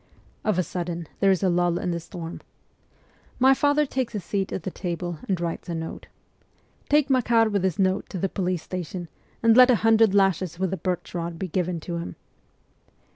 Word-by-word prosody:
Of 215 -4 +1
a 185 - +2
sudden 175 -2 -4
there 195 - +4
is 190 0 +2
a 190 - +3
lull 175 0 +2
in 180 - -2
the 170 - -2
storm. 165 0 -8 1.0
My 265 +1 +6
father 290 +2 +2
takes 260 -3 -2
his 205 -4 -4
seat 195 +2 -2
at 180 - -4
the 190 - -4
table 175 -2 -4
and 185 -3 +1
writes 170 +1 -4
a 170 - -2
note. 160 0 -6 0.4
' - - -37
Take 290 -1 +3
Makar 235 -3 +3
with 205 -2 0
this 185 -1 0
note 190 -1 +1
to 190 - -5
the 195 - 0
police 185 -3 -2
station, 180 -1 -5 0.3
and 230 -1 +6
let 255 +1 +8
a 250 - +6
hundred 225 -2 +5
lashes 190 -3 +2
with 190 0 -1
the 190 - -2
birch 180 +1 -3
rod 170 -1 -4
be 190 - -3
given 180 0 -1
to 170 +2 -4
him.' 170 - -6
185 Hz, 205 wpm, -25 LUFS, 175-215 Hz, 1.0 s, let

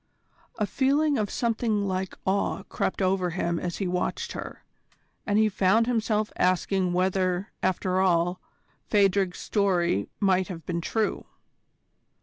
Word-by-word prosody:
A 210 - +1
feeling 280 +4 +2
of 205 -2 -1
something 225 -3 0
like 190 0 -3
awe 195 0 0
crept 190 - -2
over 185 -1 +1
him 170 -1 -1
as 175 -1 -4
he 195 - -2
watched 180 0 -2
her, - - -7 0.6
and 205 0 +2
he 220 0 +5
found 210 +2 +3
himself 220 -3 0
asking 185 0 +1
whether, 185 0 0
after 185 0 0
all, 175 -1 +2 0.5
Phadrig's 195 -2 +2
story 175 - 0
might 190 -2 +2
have 170 -4 -8
been 170 -1 -2
true. 220 +5 -1
190 Hz, 135 wpm, -26 LUFS, 180-210 Hz, 0.6 s, he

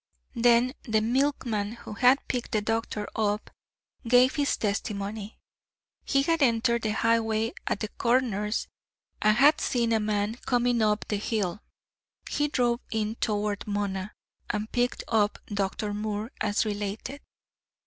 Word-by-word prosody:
Then 240 +1 +4
the 220 -3 +1
milkman, 230 -3 0
who 235 - -9
had 250 +6 +4
picked 245 -1 -3
the 215 - +2
doctor 225 -1 -2
up, 210 -1 -1 0.6
gave 250 +2 +5
his 285 -2 +1
testimony. 205 0 -3 0.7
He 275 0 +2
had 330 +2 +1
entered 235 -2 +3
the 215 -1 -1
highway 225 0 +1
at - - -1
the 215 - -1
Corners 225 -3 0 0.5
and 215 0 +4
had 295 +4 +5
seen 235 -2 +1
a 220 - +3
man 210 +1 -1
coming 245 -1 +2
up 210 0 +1
the 210 - -1
hill. 210 -2 -2 0.7
He 295 - 0
drove 240 -4 +1
in 220 -1 -1
toward 210 -2 -2
Mona, 205 -1 -2 0.4
and 210 +1 -2
picked 245 0 0
up 215 -2 +2
Dr. 205 +1 -2
Moore, 210 +2 -3
as 210 +1 +1
related. 210 +6 -4
220 Hz, 140 wpm, -27 LUFS, 210-245 Hz, 0.7 s, gave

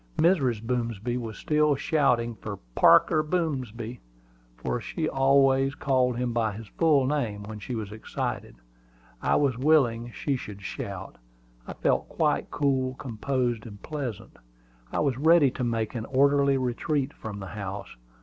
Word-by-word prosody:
Mrs. 135 - +2
Boomsby 120 -1 -2
was 115 -3 -6
still 150 -1 +2
shouting 135 -7 +1
for 105 -2 -7 0.2
"Parker 155 - +5
Boomsby," 130 -8 -3 0.6
for 120 - -2
she 160 +5 -3
always 135 0 +3
called 130 -4 +1
him 125 -1 -1
by 115 -3 0
his 110 +1 -9
full 150 -5 +3
name 120 -8 -1
when 105 +1 -7
she 120 +4 -5
was 105 -3 -5
excited. 110 - -4 0.7
I - - +2
was 135 -5 +1
willing 125 -5 +3
she 140 +3 -2
should 100 -4 -9
shout. - - -6 0.5
I - - -5
felt - - 0
quite - - 0
cool, 130 -2 0
composed, 120 -1 -2
and 100 -2 -10
pleasant. 140 - -5 0.5
I - - 0
was 135 -4 0
ready 160 -2 +5
to 130 - -4
make 115 -2 -1
an 115 -3 -4
orderly 140 +1 +3
retreat 135 +3 -1
from 105 -2 -7
the 95 -1 -7
house. 100 -5 -6
125 Hz, 150 wpm, -27 LUFS, 115-140 Hz, 0.7 s, Parker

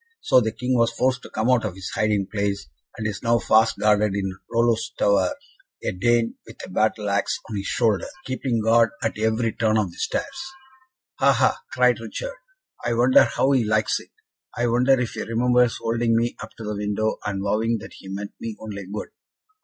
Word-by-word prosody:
So 130 - +4
the 110 -1 -1
King 125 +3 -1
was 115 -1 +3
forced 125 +2 0
to - - -11
come 110 +4 0
out 125 -3 +3
of 105 -4 -3
his 95 -1 -6
hiding 105 -2 +1
place, 100 -4 -2 0.3
and 110 - -4
is 105 -2 -3
now 115 -1 +3
fast 110 0 +3
guarded 105 -1 +2
in 95 -2 -2 0.2
Rollo's 115 -1 +1
tower 95 -3 +2 0.5
a - - 0
Dane, 115 +4 +1
with - - -11
a - - -12
battle 110 +1 0
axe 100 0 0
on 110 -2 -4
his 100 - -4
shoulder, 110 -5 +1 0.2
keeping 130 -3 -1
guard 115 +1 +5
at 110 -1 -2
every 110 +1 +1
turn 110 -1 +1
of 100 -5 0
the - - -16
stairs." - - -1 0.9
"Ha! - - +5
ha!" - - +2
cried - - +3
Richard. - - -5 0.5
"I 120 - 0
wonder 125 +2 +6
how 130 +3 +1
he 130 -3 +3
likes 110 0 +1
it. - - -15 0.5
I 120 - +1
wonder 125 +3 +3
if 125 -2 -1
he - - -5
remembers 125 +1 +2
holding 115 0 +1
me 120 +1 0
up - - -7
to 115 - -8
the 105 0 -3
window, 105 +1 -1
and 100 -1 -3
vowing 110 +3 +1
that - - -10
he - - -12
meant 100 +1 -5
me 115 -2 -6
only 100 -3 -7
good!" 105 - -5
110 Hz, 200 wpm, -23 LUFS, 105-120 Hz, 0.9 s, wonder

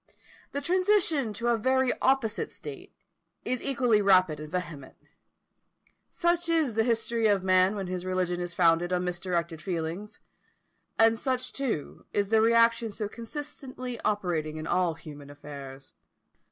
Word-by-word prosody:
The 285 - -3
transition 350 - +2
to 235 +3 -1
a 235 - +3
very 260 +2 +2
opposite 255 -5 +1
state - - -9 0.5
is 255 -1 -1
equally 245 -6 +2
rapid 185 -6 +4
and 150 0 -8
vehement. 165 -7 -5 1.1
Such 345 0 0
is 320 -7 +2
the 220 +1 +2
history 230 -1 +1
of 200 -3 +2
man 185 +1 +4
when 195 -2 -3
his 180 0 -4
religion 185 -1 -1
is 175 -1 -4
founded 170 0 +3
on 180 0 +1
misdirected 175 -2 -2
feelings; 180 +3 -4 0.8
and 225 0 +4
such, 255 -1 -2
too, 250 - -4
is 200 -1 0
the 220 0 +4
reaction 230 0 +4
so 210 0 -3
constantly 255 +1 -7
operating 170 -7 -1
in 155 - -5
all 175 -1 +1
human 145 -3 -11
affairs. 140 -2 -10
205 Hz, 140 wpm, -28 LUFS, 175-245 Hz, 1.1 s, rapid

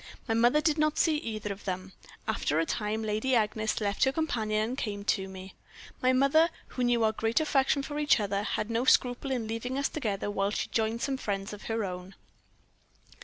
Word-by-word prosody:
My 225 - +1
mother 240 +6 +4
did 305 -1 +2
not 305 0 +2
see 315 -2 +3
either 215 -6 -4
of 200 - -15
them. 185 0 -4 0.3
After 150 - 0
a 165 - +2
time 215 +5 -2
Lady 220 +5 0
Agnes 220 -1 0
left 200 -2 0
her 265 - +2
companion 220 -8 0
and 255 - -3
came 205 -6 -4
to 195 -2 +1
me. 190 0 -9 0.5
My 255 - +4
mother, 275 +6 +4 0.2
who 255 - -3
knew 240 -1 +3
our 220 - +4
great 225 +3 +1
affection 280 -2 +2
for 295 +1 -4
each 295 -5 +4
other, 200 -1 -1
had 215 +1 -2
no 230 +2 +1
scruple 250 +1 +3
in 245 -4 -1
leaving 230 +4 -3
us 280 - +1
together 205 -8 -2
while 200 -1 0
she 210 - -2
joined 225 +1 0
some 275 -1 -1
friends 200 -4 -3
of 210 - -10
her 225 -2 -1
own. 180 +1 -7
225 Hz, 205 wpm, -29 LUFS, 205-265 Hz, 0.5 s, mother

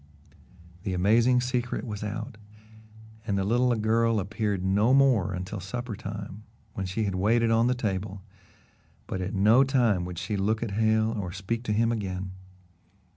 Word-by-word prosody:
The 95 0 -3
amazing 115 +7 +4
secret 125 0 -2
was 105 -3 -5
out, 110 +3 -5 0.9
and 100 -3 0
the 95 - +1
little 120 +4 +2
girl 115 +1 +2
appeared 100 -1 -2
no 105 +7 +3
more 125 -9 +4
until 95 +3 -5
supper 115 +4 -5
time, 100 +1 -7 0.3
when 95 -1 -4
she 105 +4 -1
waited 115 +5 +2
on 115 +1 +3
the 125 - +1
table, 100 -4 -3 0.8
but 95 - -4
at 95 +3 -3
no 110 +7 +5
time 120 -9 +2
would 90 -1 -7
she 105 +3 -3
look 110 +4 0
at 115 - -4
Hale 110 +1 +2
or 100 -6 -4
speak 100 +5 -3
to 105 - -1
him 115 +2 +2
again. 95 -4 -3
105 Hz, 160 wpm, -27 LUFS, 95-115 Hz, 0.9 s, no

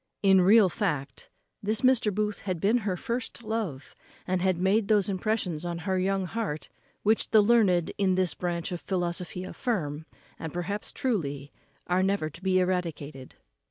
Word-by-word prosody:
In 190 -1 +6
real 205 +2 +6
fact, 150 -8 -3 0.3
this 215 +2 0
Mr. 255 -5 +3
Booth 210 +1 -1
had 185 -4 -3
been 215 +8 +3
her 195 -5 -2
first 235 +3 -4
love, 215 -11 -4 0.3
and 185 -1 0
had 185 -1 +2
made 195 +4 +2
those 210 -3 +3
impressions 190 -5 -1
on 175 -1 -3
her 185 +2 -1
young 195 0 0
heart, 180 -6 -4 0.3
which 215 +2 +2
the 220 - +6
learned 205 -6 +4
in 190 -2 +3
this 185 -2 +1
branch 175 -1 -3
of 175 - -4
philosophy 180 -1 -3
affirm, 160 - -3 0.3
and 160 - -5
perhaps 190 +4 -3
truly, 145 - -2 0.3
are 180 +1 +1
never 190 -5 0
to 165 - -13
be 190 -1 +2
eradicated. 165 -7 -2
185 Hz, 160 wpm, -28 LUFS, 170-210 Hz, 0.3 s, In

